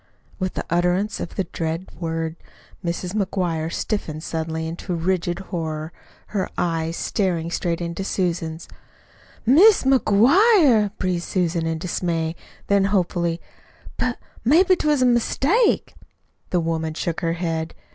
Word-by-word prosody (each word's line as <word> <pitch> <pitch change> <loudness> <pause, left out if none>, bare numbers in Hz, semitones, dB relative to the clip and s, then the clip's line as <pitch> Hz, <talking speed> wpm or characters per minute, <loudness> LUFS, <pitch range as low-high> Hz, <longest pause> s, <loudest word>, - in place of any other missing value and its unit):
With 185 -1 -2
the - - -3
utterance 180 +4 +1
of - - -6
the 195 - 0
dread 165 +1 -4
word 165 -1 -2 0.5
Mrs. 175 +1 -3
McGuire 180 -6 -1
stiffened 160 -8 -3
suddenly 160 -1 -3
into 175 +2 -4
rigid 175 0 0 0.2
horror, 160 -1 -3 0.4
her 195 -3 -2
eyes 165 -1 -1
staring 170 -4 -1
straight 170 -1 -1
into 170 +2 -3
Susan's. 170 -4 -2 0.8
"MIS' 360 - +7
MCGUIRE!" 265 - +5
breathed 180 -2 -1
Susan 170 -3 0
in 165 0 -1
dismay; 165 -1 -2 0.3
then 200 -1 +3
hopefully, 175 -4 0 0.6
"But 250 -1 -1 0.3
maybe 355 +9 +5
'twas 300 -6 +2
a - - +5
mistake." 275 - +2 0.6
The 180 - +1
woman 160 -1 -2
shook 170 0 -2
her 165 -1 0
head. 165 -2 -3
175 Hz, 125 wpm, -22 LUFS, 165-205 Hz, 0.8 s, MIS